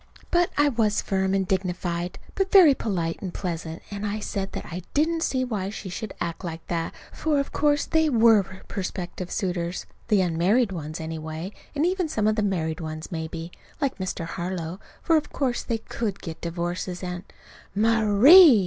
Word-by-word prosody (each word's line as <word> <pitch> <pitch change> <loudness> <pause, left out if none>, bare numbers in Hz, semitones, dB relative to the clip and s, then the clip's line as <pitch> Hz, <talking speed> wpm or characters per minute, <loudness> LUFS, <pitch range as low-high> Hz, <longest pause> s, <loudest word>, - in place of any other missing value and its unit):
But 350 0 +3
I 290 0 +5
was 220 -5 +2
firm 190 0 0
and 190 -1 +1
dignified 180 -2 -1 0.2
but 390 -1 0
very 355 -8 +9
polite 175 -9 -2
and 185 - -4
pleasant 165 -3 -4
and 205 0 -5
I 210 +1 -1
said 195 -2 -3
that - - -5
I 175 +2 -6
didn't 325 +3 +2
see 260 -5 +1
why 205 -6 -2
she 200 -2 -6
should 215 +4 -5
act 170 +1 -3
like 165 -2 -5
that, 165 -1 -2 0.2
for 305 -2 +1
of 280 - -2
course 290 -1 +2
they 320 -1 +2
were 225 -4 +6 0.3
prospective 185 -1 -4
suitors, 180 -3 -2 0.2
the 210 -4 +4
unmarried 185 +7 +2
ones, 155 -3 -5
anyway, 160 +2 -5 0.2
and 295 +3 +2
even 365 -2 0
some 215 -7 0
of 215 - +3
the 215 - +1
married 170 -5 -1
ones, 155 -1 -6
maybe, 165 0 -5 0.3
like 275 -7 -1
Mr. 185 -2 -3
Harlow, 175 0 -4 0.2
for 330 - +4
of 300 - -2
course 255 -4 0
they 230 - -1
could 220 -2 -4
get 165 -2 -7
divorces, 175 +2 -3
and 180 0 -4 0.5
"Ma_rie_!" 225 - +8
195 Hz, 175 wpm, -25 LUFS, 170-235 Hz, 0.5 s, very